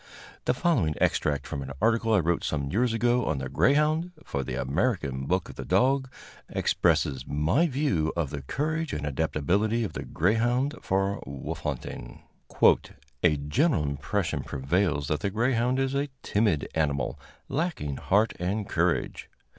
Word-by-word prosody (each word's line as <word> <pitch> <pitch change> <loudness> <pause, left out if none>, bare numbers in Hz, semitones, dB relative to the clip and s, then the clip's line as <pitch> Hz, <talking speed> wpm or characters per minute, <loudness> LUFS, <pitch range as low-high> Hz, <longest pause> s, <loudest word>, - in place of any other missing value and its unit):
The - - +2
following 125 - +1
extract, 70 -2 +1
from 70 - -4
an 70 0 -6
article 115 +2 +2
I 105 -4 +5
wrote 85 +1 0
some 70 -2 -2
years 120 +6 +2
ago 120 +1 +2
on 75 - 0
the 65 -1 -3
"Greyhound," 155 +5 +2
for 70 - -3
the - - -4
"American 70 - -1
Book 90 0 0
of - - -11
the - - -4
Dog," 130 +1 +2 0.4
expresses 65 -2 +1
my 80 - +2
views 125 - 0
of 80 -5 -1
the 75 - -4
courage 155 - -2
and 75 -1 -3
adaptability 85 - 0
of 105 - -4
the - - -4
greyhound 120 - +1
for 95 +1 0
wolf 70 0 -5
hunting: - - -6 1.0
"A 80 -4 +4
general 80 - +1
impression 75 +7 -1
prevails 75 +1 0
that 75 - 0
the 100 - -1
greyhound 120 +4 +1
is 135 0 0
a 140 +1 0
timid 100 -8 +1
animal, 70 -4 -1 0.3
lacking 135 - -2
heart 105 +3 +2
and 100 +4 -1
courage. 85 0 0
95 Hz, 155 wpm, -27 LUFS, 75-125 Hz, 1.0 s, I